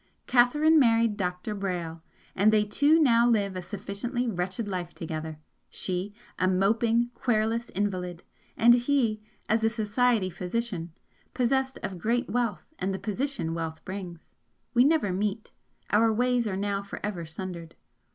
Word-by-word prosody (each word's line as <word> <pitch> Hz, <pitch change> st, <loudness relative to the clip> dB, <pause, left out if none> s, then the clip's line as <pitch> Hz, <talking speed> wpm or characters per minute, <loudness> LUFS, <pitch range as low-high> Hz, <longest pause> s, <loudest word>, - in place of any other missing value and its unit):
Catherine 295 Hz, +6 st, +4 dB
married 230 Hz, -4 st, +3 dB
Dr. 180 Hz, +1 st, -3 dB
Brayle, 175 Hz, -5 st, -4 dB, 0.3 s
and 205 Hz, +3 st, +4 dB
they 210 Hz, -1 st, +3 dB
two 285 Hz, +10 st, +4 dB
now 240 Hz, -5 st, +5 dB
live 200 Hz, -4 st, +1 dB
a 185 Hz, -, -3 dB
sufficiently 205 Hz, +6 st, -4 dB
wretched 190 Hz, +2 st, -2 dB
life 180 Hz, -3 st, -4 dB
together, 160 Hz, -1 st, -5 dB, 0.3 s
she, 185 Hz, +2 st, -3 dB, 0.3 s
a 185 Hz, -, +3 dB
moping, 225 Hz, +5 st, +2 dB
querulous 230 Hz, 0 st, 0 dB
invalid, 180 Hz, -3 st, -3 dB, 0.3 s
and 235 Hz, +1 st, +7 dB
he 240 Hz, -3 st, +1 dB, 0.3 s
as 220 Hz, +1 st, +1 dB
a 225 Hz, -, +4 dB
'society' 220 Hz, -2 st, +1 dB
physician, 180 Hz, -1 st, -3 dB, 0.4 s
possessed 265 Hz, +1 st, +1 dB
of 185 Hz, -2 st, -4 dB
great 235 Hz, +5 st, 0 dB
wealth 240 Hz, -3 st, -1 dB
and 190 Hz, +1 st, -1 dB
the -, -, -3 dB
position 215 Hz, -, -2 dB
wealth 160 Hz, -1 st, -5 dB
brings. 185 Hz, -3 st, -8 dB, 0.4 s
We 245 Hz, +1 st, +5 dB
never 290 Hz, -, +2 dB
meet, 205 Hz, +3 st, -2 dB, 0.4 s
our 225 Hz, +2 st, +4 dB
ways 245 Hz, +1 st, +1 dB
are 190 Hz, -2 st, -2 dB
now 200 Hz, 0 st, -1 dB
for 200 Hz, -, -8 dB
ever 190 Hz, -5 st, -3 dB
sundered. 170 Hz, 0 st, -7 dB
210 Hz, 145 wpm, -27 LUFS, 185-235 Hz, 0.4 s, and